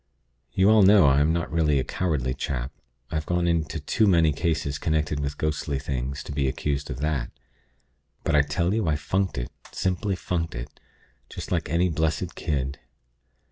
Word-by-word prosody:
You 95 +1 +4
all 110 -1 +6
know 100 -2 +7
I 70 +1 +5
am 75 +2 +3
not 85 +1 -1
really 80 -3 +2
a 65 - +1
cowardly 70 -6 -1
chap. 65 -1 -3 0.4
I've 80 -1 -2
gone 90 0 +1
into 80 -1 0
too 105 +8 +1
many 85 -5 +4
cases 75 -3 -1
connected 75 -2 0
with 70 0 -3
ghostly 75 -2 -1
things, 70 0 -3
to - - -8
be 70 -1 0
accused 70 +2 -2
of 65 - -5
that; 75 -5 -1 0.9
but 80 - +1
I 75 - +7
tell 85 +6 0
you 110 -4 0
I 75 - +2
funked 95 +3 -1
it; - - -4 0.2
simply 95 +2 -1
funked 85 -2 -3
it, - - -8 0.5
just - - -7
like - - 0
any 85 +3 +2
blessed 80 -1 -1
kid. 70 -3 -2
75 Hz, 180 wpm, -25 LUFS, 70-85 Hz, 0.9 s, know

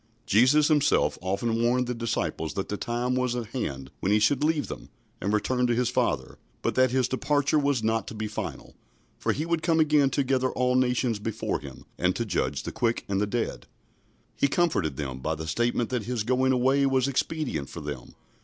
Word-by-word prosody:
" - - -39
Jesus 130 +7 +5
Himself 150 -3 +2
often 105 +5 -1
warned 125 +2 +2
the 125 - -2
disciples 115 -8 -2
that 95 - -3
the 105 - -1
time 120 +4 -2
was 125 -1 0
at 120 -2 -3
hand 70 - -4
when 95 - 0
He 105 - +5
should 130 +7 +2
leave 155 -1 +1
them - - -8 0.3
and 100 - -1
return 125 +4 +1
to 120 - +1
His 125 0 +1
Father, - - -1 0.2
but - - +1
that 130 0 +4
His 130 0 +1
departure 145 +3 +1
was 140 -5 +1
not 110 -1 0
to - - -7
be 110 0 -3
final, 105 - -6 0.5
for - - +1
He 155 - -2
would 170 -1 0
come 165 -1 +2
again 150 -3 +4
to 140 - 0
gather 130 -1 +1
all 125 0 +1
nations 125 -3 +1
before 110 +1 -2
Him, 65 -2 -11
and 90 +1 +2
to 115 - -1
judge 110 - -1
the - - -4
quick 115 -1 -1
and 100 0 0
the 105 - +1
dead. 115 +2 -3 0.7
He - - +2
comforted 135 - 0
them 65 -3 -4
by 80 +4 -2
the 80 +1 -6
statement 120 +8 0
that 120 -5 -1
His 120 -3 -2
going 130 +3 +2
away 130 +2 +3
was 130 -1 +2
expedient 140 - -2
for 85 - -8
them. 70 -4 -7
120 Hz, 210 wpm, -27 LUFS, 105-130 Hz, 0.7 s, Jesus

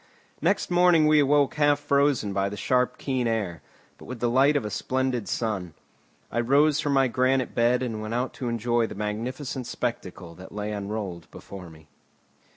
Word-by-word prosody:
Next - - 0
morning 175 -3 +5
we 155 0 +5
awoke 145 0 +3
half 145 -1 +3
frozen 140 -7 +1
by 100 0 0
the 105 - -7
sharp 125 +3 +1
keen 130 -3 -1
air, 105 -7 -2 0.4
but - - -12
with 125 -1 -7
the 120 0 0
light 135 +4 +4
of 140 - 0
a 105 - -4
splendid 130 -3 -1
sun. 95 -8 -3 0.6
I 120 - -1
rose 140 +5 +3
from 145 -2 0
my 135 -1 +4
granite 130 +1 +1
bed 120 +2 +2
and 110 -4 -4
went 110 +2 -4
out 125 +2 -2
to 125 - -1
enjoy 115 0 0
the - - -9
magnificent 120 +5 -4
spectacle 95 -9 -5
that 95 +2 -12
lay 105 0 -4
unrolled 100 -4 -5
before 95 -3 -10
me. 80 -1 -17
120 Hz, 180 wpm, -25 LUFS, 105-135 Hz, 0.6 s, morning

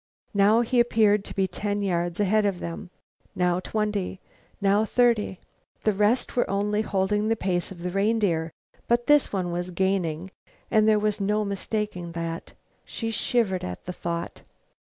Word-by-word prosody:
Now 205 +3 +5
he 240 +1 +1
appeared 215 -4 +3
to - - -8
be 195 -1 +2
ten 205 +1 -2
yards 175 -2 -1
ahead 210 +1 +3
of 195 -3 0
them, 170 +3 -6 0.5
now 180 0 +2
twenty, 210 -2 -2 0.4
now 200 +1 +3
thirty. 225 -4 +2 0.4
The 215 - +3
rest 210 +5 +1
were 245 - +1
only 205 +2 +1
holding 210 0 0
the 225 - +2
pace 180 -4 -1
of 175 -2 -9
the 180 - -2
reindeer, 195 -5 +1 0.4
but 240 0 +2
this 295 -1 +4
one 185 -3 -1
was 175 +1 -3
gaining, 185 -2 -1 0.4
there 215 -1 +5
was 210 -1 0
no 210 +2 +1
mistaking 200 -3 -3
that. 165 0 -5 0.3
She 225 -1 -4
shivered 215 -4 0
at 90 0 -6
the 180 - -4
thought. 170 -1 -4
200 Hz, 155 wpm, -26 LUFS, 180-215 Hz, 0.5 s, Now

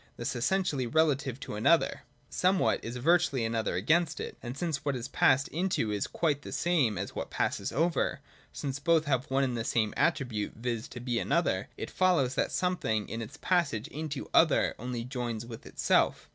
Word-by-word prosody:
Thus - - -3
essentially 140 0 0
relative 140 -3 +1
to - - -6
another, 135 +11 +2 0.3
somewhat 185 +1 +1
is 120 +2 -5
virtually 145 -3 +2
an 115 - -2
other 115 -1 -1
against 155 - +2
it: - - -5
and 120 +2 -6
since 160 -4 -2
what 140 -2 0
is 120 0 -4
passed 130 +1 +3
into 170 - 0
is 105 -1 -1
quite 150 -4 0
the - - -8
same 150 - +1
as 95 +2 -4
what - - -4
passes - - -1
over, 165 -1 0 0.3
since 135 -2 -4
both 160 +2 +3
have 135 0 0
one 135 +1 +2
and 125 -2 0
the 115 - -2
same 110 -2 0
attribute, 115 -6 0
viz. 115 0 -3
to 120 - -9
be 120 -1 -1
an - - -4
other, - - +1
it - - -5
follows 170 -9 +2
that - - 0
some 180 0 0
thing 110 -7 -1
in 115 +2 -4
its 130 +6 -8
passage 155 - +1
into 150 -2 -5
other - - +4
only 120 0 -4
joins 120 -3 -4
with 115 -1 -10
itself. - - +1
130 Hz, 195 wpm, -30 LUFS, 115-160 Hz, 0.3 s, other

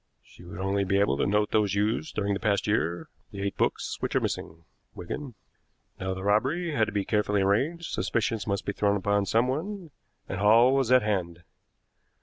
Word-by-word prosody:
She - - -17
would 85 -1 -10
only 95 +1 0
be 100 +1 +1
able 100 -9 +2
to - - +1
note 105 +1 +1
those 105 -3 +2
used 110 +9 -1
during 100 -1 0
the 100 - -2
past 100 -2 0
year 85 -5 -1 0.2
the 100 -1 -6
eight 100 - -2
books - - -1
which - - -3
are - - +5
missing, 80 0 -5 0.3
Wigan. 125 +8 -6 0.6
Now 95 0 -3
the 95 - -7
robbery 135 - +1
had 120 -7 +2
to - - -4
be 100 -2 -1
carefully 105 -2 +1
arranged, 150 - 0
suspicion 115 -1 -1
must 100 -1 -2
be 100 - -2
thrown 100 0 +1
upon 100 0 0
someone, 155 - -1 0.4
and 95 - -4
Hall 115 +5 +5
was 135 -3 +1
at 130 -2 +6
hand. 90 -5 -2
105 Hz, 190 wpm, -27 LUFS, 100-120 Hz, 0.6 s, at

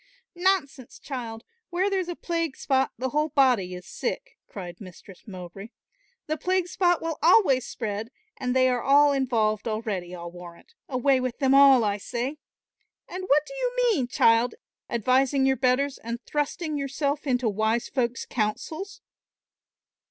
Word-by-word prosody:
"Nonsense, 350 -9 -1
child, 235 -4 -6 0.3
where 365 +2 0
there's 385 -3 -1
a 350 - -3
plague 335 -5 -3
spot, 265 -1 +1
the 260 +3 -2
whole 300 +3 0
body 245 -11 +2
is 180 - -10
sick," - - -5
cried 180 -2 -9
Mistress 185 +1 -13
Mowbray. 185 +2 -9 0.6
"The 310 +1 -2
plague 370 +2 0
spot 350 -2 +1
will 325 -2 -3
always 320 - +4
spread, 215 -1 -4 0.3
and 250 -1 -2
they 255 0 +5
are 250 -1 +1
all 285 +2 +5
involved 230 -5 0
already, 210 -5 -3
I'll 170 -1 -8
warrant; 175 -1 -13 0.2
away 265 0 +2
with 255 -1 -3
them 270 -2 +2
all 275 -3 +7
I 205 -1 0
say. 245 +8 -4 0.7
And 370 +1 -6
what 295 0 +4
do - - -10
you - - -2 0.2
mean, 275 - 0
child, 230 - +3 0.3
advising 260 +4 +2
your 265 0 +3
betters 260 +2 +1
and 235 +1 -5
thrusting 295 +1 -2
yourself 280 +2 -2
into 250 -2 +1
wise 220 +3 0
folks' 250 -2 -2
counsels?" 310 - -3
260 Hz, 150 wpm, -26 LUFS, 225-300 Hz, 0.7 s, all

